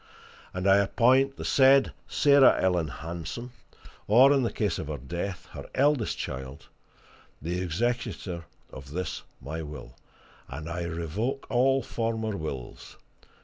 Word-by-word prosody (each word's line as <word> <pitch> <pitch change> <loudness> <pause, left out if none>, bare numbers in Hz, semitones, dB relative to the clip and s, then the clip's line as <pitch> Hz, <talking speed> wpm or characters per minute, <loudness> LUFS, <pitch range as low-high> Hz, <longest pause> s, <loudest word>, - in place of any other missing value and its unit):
And 90 +1 -2
I 95 0 +7
appoint 130 +6 +3
the - - -6
said 135 0 +5
Sarah 140 -2 +5
Ellen 90 -4 +1
Hanson, 85 - -6 0.6
or 130 +7 +7
in 140 - +3
the 120 - 0
case 105 -2 -1
of 80 - -5
her 75 -1 -4
death, 85 +8 -5
her - - -9
eldest 140 -4 +2
child, 65 +1 -6 0.7
the 85 +4 -3
executor 95 -2 -2 0.3
of 70 +2 -10
this 90 +2 -3 0.2
my 80 +4 -5
will; 75 -5 -9 0.5
and 80 +1 -7
I 85 +1 -3
revoke 85 - -3
all 135 +1 +3
former 110 -2 -2
wills. 70 -8 -7
95 Hz, 135 wpm, -27 LUFS, 80-125 Hz, 0.7 s, I